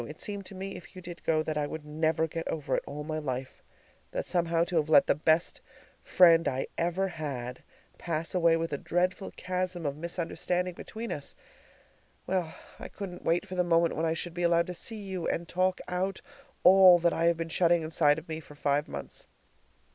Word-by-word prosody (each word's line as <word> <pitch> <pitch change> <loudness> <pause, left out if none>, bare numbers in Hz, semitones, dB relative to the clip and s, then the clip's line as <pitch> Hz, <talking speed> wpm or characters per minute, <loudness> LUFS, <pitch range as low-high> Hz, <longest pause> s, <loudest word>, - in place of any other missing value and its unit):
It 150 - -10
seemed 200 -2 -4
to 195 - -8
me, 195 +1 -5
if 180 - -12
you 185 - -8
did 175 -1 -9
go, 155 -1 +2
that 155 -1 -2
I 145 - -1
would 155 0 -7
never 160 +1 +1
get 165 +1 -5
over 150 -3 -1
it - - -1
all 150 +1 -5
my 155 +1 -3
life; 130 -3 -5 0.5
that - - -3
somehow 170 -1 +1
to 175 0 -1
have 155 -1 +1
let 150 -3 +7
the - - +3
best 160 +3 +1 0.4
friend 165 -2 +5
I 130 0 -1
ever 175 +3 0
had 135 -8 -5 0.4
pass 165 -1 -3
away 170 -2 +4
with 165 -2 -3
a 140 - -2
dreadful 180 +3 -1
chasm 185 -2 -3
of 140 -1 -1
misunderstanding 175 +2 -2
between 225 +6 -7
us 145 - -5 0.9
well 180 -4 -1 0.3
I - - -6
couldn't 185 -3 -8
wait 170 +4 +2
for 190 - -9
the 180 -1 +2
moment 170 -1 +2
when 165 +1 0
I 160 - 0
should 170 +1 -4
be 175 - -4
allowed 170 0 +3
to 180 - -5
see 210 +4 -5
you 190 -3 -4
and 170 0 -2
talk 185 +2 +1
out 185 +2 -2 0.4
all 185 -1 +9
that 170 0 +2
I 165 - 0
have 170 -1 +3
been 165 0 -4
shutting 170 0 +3
inside 155 0 +2
me 160 -1 -4
for 150 -2 -14
five 145 0 0
months. - - -7
170 Hz, 205 wpm, -29 LUFS, 155-180 Hz, 0.9 s, all